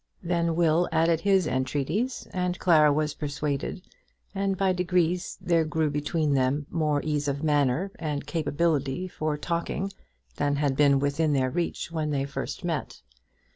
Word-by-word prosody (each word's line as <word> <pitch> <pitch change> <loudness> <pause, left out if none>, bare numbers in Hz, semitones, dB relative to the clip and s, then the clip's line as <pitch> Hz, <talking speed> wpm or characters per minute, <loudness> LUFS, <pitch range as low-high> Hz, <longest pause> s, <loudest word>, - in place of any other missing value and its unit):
Then 170 -1 0
Will 170 +1 +3
added 165 0 +3
his 195 -1 +3
entreaties, 145 - -1
and 180 -1 -1
Clara 155 -4 +5
was 150 0 0
persuaded, 145 +3 -3 0.5
and 195 -1 -1
by 190 -1 +2
degrees 180 0 0
there 170 -2 +2
grew 155 -1 0
between 150 +1 0
them 135 +2 +1
more 150 -3 0
ease 150 -1 -1
of 140 +1 -2
manner 150 +4 +1
and 150 -3 -3
capability 160 0 0
for 155 -4 -2
talking 170 +4 -2 0.5
than 145 0 +1
had 140 -2 +1
been 140 -1 +5
within 145 +2 +1
their 130 -2 +1
reach 170 +1 -2
when 155 -2 -2
they 140 -2 0
first 140 +6 -5
met. 165 -5 -3
155 Hz, 150 wpm, -27 LUFS, 145-175 Hz, 0.5 s, Clara